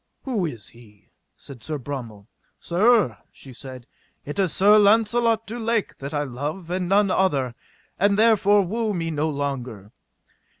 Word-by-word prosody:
Who 220 -10 -1
is 115 -9 -8
he? 110 -4 -20 0.2
said 135 -4 -12
Sir 155 +5 -4
Bromel. 120 -7 -7 0.3
Sir, 190 - +2
she 135 - -14
said, 130 -1 -10 0.4
it 145 +6 -6
is 190 -4 +1
Sir 205 +5 +5
Launcelot 225 +2 +3
du 235 +3 -6
Lake 230 -2 -2
that 140 +1 -6
I 145 -1 -1
love 150 +7 -5
and 180 -1 -2
none 200 0 +3
other, 140 -11 +1 0.5
and 200 +1 +3
therefore 205 -2 +4
woo 220 +2 -2
me 165 -1 -2
no 155 +1 -1
longer. 130 -8 -5
170 Hz, 155 wpm, -23 LUFS, 130-210 Hz, 0.5 s, Sir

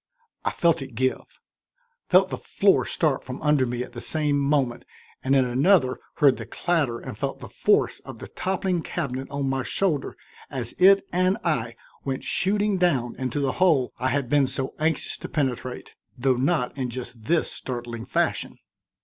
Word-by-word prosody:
I - - +1
felt 170 -2 +2
it 135 -4 -8
give, 130 +3 -2 0.7
felt 185 +1 +5
the - - -2
floor 195 -1 +2
start 150 -5 0
from 130 +1 -7
under 150 -4 +3
me 120 +1 -2
at 125 - -11
the 120 -1 -8
same 150 -2 +1
moment, 140 -4 +1 0.4
and 135 +1 +2
in 130 -1 +4
another 130 +2 +3 0.2
heard 140 -3 +4
the - - -7
clatter 155 -9 0
and - - -7
felt - - -3
the - - -9
force - - +1
of - - -9
the - - -8
toppling 185 -2 -1
cabinet 135 -6 -4
on 140 -1 -2
my 135 0 0
shoulder 155 0 -1 0.3
as 125 -4 -4
it 195 +2 +6
and 185 +2 +2
I 120 -9 -1 0.3
went 135 -1 -3
shooting 205 +1 +1
down 140 -10 +1
into 130 +2 -2
the 135 -1 +1
hole 155 -9 +3
I 130 - 0
had 135 0 0
been 140 +1 +3
so 130 0 -3
anxious 160 +1 -1
to - - -8
penetrate, 130 -4 -3 0.2
though 130 +1 +2
not 130 0 0
in 130 -3 -2
just 120 -2 -7
this 170 +1 +1
startling 120 -2 -5
fashion. - - -1
135 Hz, 175 wpm, -25 LUFS, 125-170 Hz, 0.7 s, it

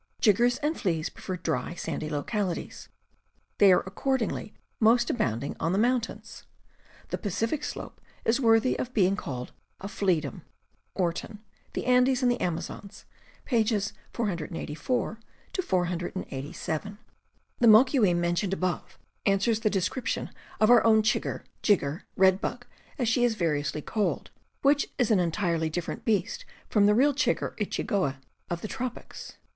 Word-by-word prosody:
Jiggers 240 +4 +4
and 305 +2 +1
fleas 165 -6 0
prefer 185 -1 -6
dry, 175 0 -2
sandy 155 -2 -4
localities; 175 +5 -3 0.7
they 200 -2 +8
are 180 - +4
accor 265 +8 -1
dingly 220 -2 -3 0.3
most 235 +2 +4
abounding 130 - -1
on 165 +3 0
the - - +1
mountains. 240 +2 -1 0.7
The - - -3
Pacific 225 - -1
slope - - -6 0.2
is 235 +5 +2
worthy 225 +1 +4
of 255 0 -4
being 195 -2 +4
called 125 -9 -5 0.4
flea 185 -5 +1
dom. 140 -4 -7 0.3
— - - -43
Orton, 195 +4 -2 0.3
The - - -3
Andes 250 +1 +4
and 245 - +4
the 245 - -2
Amazons, 180 +3 -4 0.4
pp. 220 -4 +1 0.2
484 190 - -2 0.4
487. 175 - -3 0.6
The 240 - +5
moquim 220 -4 +6
mentioned 175 +3 0
above 185 -2 -2 0.3
answers 205 +3 +2
the 220 -1 +1
descrip 200 +6 -1
tion - - -2 0.3
of 215 +2 +5
our 245 - +7
own 220 -1 +5
chigger, 215 - 0 0.2
jigger, 170 -6 +1
red 190 0 +4
bug, - - -4 0.3
as 250 -5 0
she 240 +2 +2
is 240 -2 +3
vari 165 -7 +1
^ - - -3
ously 150 +1 -4
called, 215 -2 -1 0.3
which 285 +1 +4
is 245 -4 +2
an 205 - +5
entirely 170 -2 0
different 170 +2 -4
^. - - -33
beast 245 - 0 0.3
from 205 -2 +5
the 210 - +4
real 280 +5 +4
chigger 285 - 0
or - - -26
chigoe 185 - -1 0.3
of 175 -1 -3
the - - -4
tropics. 245 +2 -6
205 Hz, 150 wpm, -28 LUFS, 175-235 Hz, 0.7 s, they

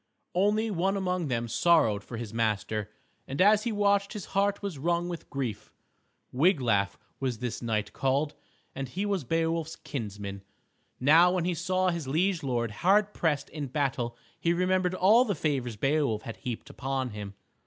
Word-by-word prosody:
Only 210 +4 +2
one 195 +2 +1
among 180 -3 -1
them 120 -3 -1
sorrowed 115 -6 +3
for 115 - -7
his 115 -2 -6
master, 110 -1 -1 0.4
and 135 - -5
as 210 +3 +5
he 235 - 0
watched 200 -1 +2
his 210 -4 -6
heart 200 +1 +1
was 190 -8 -4
wrung 170 +3 0
with 170 -2 -7
grief. 125 -7 -4 0.6
Wiglaf 125 - +2 0.2
was 130 -4 -1
this 120 0 -4
knight 110 -3 -1
called, 140 +3 0 0.4
and 135 -1 -5
he 190 +8 -2
was 200 -5 0
Beowulf's 165 +3 -1
kinsman. 100 -9 -6 0.6
Now 165 +7 +6
when 180 -2 0
he 180 - +1
saw 185 +2 +1
his 170 -5 -4
liege 170 +5 +1
lord 120 -4 -1
hard 200 - +3
pressed 150 -4 0
in 150 -2 -4
battle 125 -4 -1 0.2
he 170 - +2
remembered 185 +1 +1
all 215 +7 +6
the 205 -6 -1
favors 135 -7 -1
Beowulf 135 -2 +1
had 115 -2 -7
heaped 120 -3 -6
upon 135 -2 -2
him. 105 -1 -7
150 Hz, 165 wpm, -28 LUFS, 120-185 Hz, 0.6 s, Now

